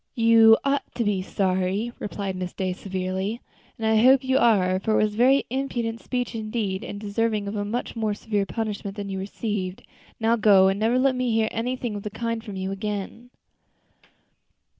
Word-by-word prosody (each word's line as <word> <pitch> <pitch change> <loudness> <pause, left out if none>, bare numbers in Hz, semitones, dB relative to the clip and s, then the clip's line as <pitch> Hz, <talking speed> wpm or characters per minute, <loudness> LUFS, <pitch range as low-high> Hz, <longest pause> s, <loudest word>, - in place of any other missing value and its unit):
"You 225 -1 +6
ought 280 0 0
to 235 - 0
be 205 -3 0
sorry," 190 +4 -1
replied 200 -2 -4
Miss 180 -1 -5
Day, 185 -1 -2
severely, 190 +3 -3 0.4
"and 225 - -4
I 220 0 +3
hope 260 +2 +6
you 260 +1 +2
are; 185 -5 +3
for 215 +3 -1
it - - +4
was 210 -1 0
a - - -9
very 265 +4 +4
impertinent 240 -4 -2
speech 250 -2 -3
indeed, 215 -3 -3
and 205 - -6
deserving 210 0 -1
of 200 - -4
a 205 - -1
much 230 +5 -4
more 215 -2 -1
severe 205 -2 -2
punishment 210 -3 -4
than 200 -1 -5
you 190 -1 -3
received. 195 -1 -4 0.4
Now 225 +1 +2
go, 200 -3 +6
and 195 +1 -1
never 225 +3 +2
let 265 +1 +3
me 250 -1 -1
hear 220 -1 +2
anything 240 0 -3
of 205 - -5
the 210 - -5
kind 230 +1 -3
from 210 -4 -8
you 190 0 -3
again." 210 +4 -5
215 Hz, 190 wpm, -24 LUFS, 195-230 Hz, 0.4 s, You